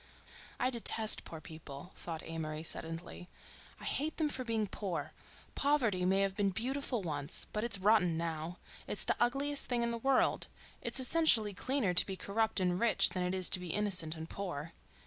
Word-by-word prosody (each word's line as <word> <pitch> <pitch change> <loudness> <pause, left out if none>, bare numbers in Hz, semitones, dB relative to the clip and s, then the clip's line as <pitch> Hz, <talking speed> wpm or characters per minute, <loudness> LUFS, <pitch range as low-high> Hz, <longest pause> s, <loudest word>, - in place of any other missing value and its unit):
"I 255 - +1
detest 225 -2 +4
poor 160 - -8
people," 155 +1 -11
thought 165 -2 -7
Amory 155 -1 -5
suddenly. 165 +2 -4 0.5
"I - - -13
hate 305 +2 -2
them 310 -2 0
for 260 -3 -5
being 225 -3 -1
poor. 195 -3 -5 0.4
Poverty 240 -11 +1
may 190 +2 +2
have 195 -1 0
been 200 -1 +1
beautiful 245 +2 -2
once, 145 -2 -3
but 210 - -2
it's 235 -4 -1
rotten 190 -4 +3
now. 165 +1 -4 0.3
It's - - -4
the - - 0
ugliest 275 +4 +3
thing 240 -2 +1
in 235 - -1
the 235 - -4
world. 270 +2 +1 0.3
It's - - +2
essentially 255 -7 +5
cleaner 245 -1 -1
to 175 - +6
be 190 - -4
corrupt 220 +3 -1
and 180 -1 0
rich 235 0 +5
than 185 - -4
it 180 +1 -1
is 185 -1 +3
to - - +5
be 180 -3 -4
innocent 185 -6 0
and 160 0 -7
poor." 170 -4 -6
195 Hz, 185 wpm, -33 LUFS, 170-235 Hz, 0.5 s, to